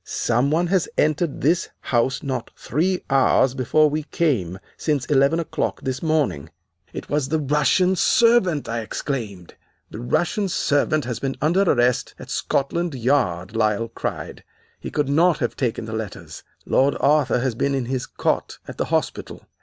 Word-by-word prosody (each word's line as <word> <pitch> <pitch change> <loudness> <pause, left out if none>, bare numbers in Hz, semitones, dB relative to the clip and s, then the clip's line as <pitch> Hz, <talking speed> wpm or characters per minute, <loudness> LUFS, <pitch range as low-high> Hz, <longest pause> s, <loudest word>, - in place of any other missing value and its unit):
Some 120 +4 0
one 165 +4 +2
has 180 -1 +1
entered 155 0 0
this 165 +5 +1
house 125 +2 0
not 130 -4 -3
three 180 +7 -1
hours 135 -1 +3
before 135 +4 +3
we 150 +1 -1
came, 125 - -1 0.2
since 145 -5 -1
eleven 140 +3 +3
o'clock 165 - -2
this 130 -1 -3
morning.' 155 - 0 0.4
"'It - - -7
was 145 -2 -1
the 160 - +1
Russian 150 +6 +2
servant!' 195 - +3
I 115 0 -2
exclaimed. 110 - -5 0.4
"'The - - -7
Russian 175 - 0
servant 145 -2 +1
has 125 -2 -4
been 135 -1 -3
under 170 +6 +2
arrest 125 -9 +1
at - - -10
Scotland 165 +3 -1
Yard,' 115 -7 0
Lyle 110 0 +1
cried. - - -5 0.4
'He - - -6
could 145 -2 -1
not 160 +4 +3
have 120 -5 -2
taken 120 -3 -2
the 110 - -7
letters. 110 -3 -6 0.2
Lord 135 +1 +2
Arthur 140 -4 +3
has 130 -1 0
been 140 +4 0
in 130 -2 -1
his 130 0 -3
cot - - -2
at - - -9
the - - +1
hospital. - - -3
140 Hz, 160 wpm, -22 LUFS, 120-155 Hz, 0.4 s, hours